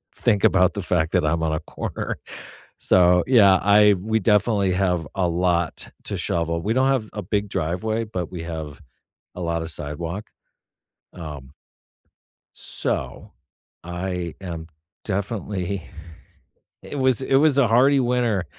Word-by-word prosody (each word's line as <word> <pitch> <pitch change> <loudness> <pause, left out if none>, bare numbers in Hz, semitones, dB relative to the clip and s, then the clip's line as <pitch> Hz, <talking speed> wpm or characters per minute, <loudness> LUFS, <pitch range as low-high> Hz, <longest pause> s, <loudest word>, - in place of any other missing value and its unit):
think 100 - +1
about 90 -1 +4
the 100 -4 -4
fact 80 -2 0
that 90 -4 +2
I'm 80 +1 0
on 80 -1 0
a 80 - -1
corner. - - -5 0.6
So, 90 -1 +4
yeah, 100 -7 +6
I 105 0 +6
we 110 +3 0
definitely 105 -3 +2
have 90 -3 0
a 95 -2 +1
lot 85 -1 0 0.2
to - - -2
shovel. 85 0 -1
We 105 +6 0
don't 130 +2 +2
have 125 -6 0
a 105 - -4
big 105 +1 -2
driveway, 95 +7 -2
but 90 -6 -5
we 85 -2 -6
have 80 -2 -7 0.5
a 90 - -6
lot 85 -1 -1
of 80 0 -4
sidewalk. 85 +7 -5 0.8
Um 75 -6 -9 1.0
so, - - -3 0.5
I 90 -1 -4
am 85 -3 -6 0.4
definitely 100 - -3 1.0
it 145 - -7
was 130 -1 +3
it 135 - +1
was 145 0 +4
a 140 -4 +4
hearty 130 +5 +4
winter, 120 -6 +1
95 Hz, 140 wpm, -23 LUFS, 85-110 Hz, 1.0 s, yeah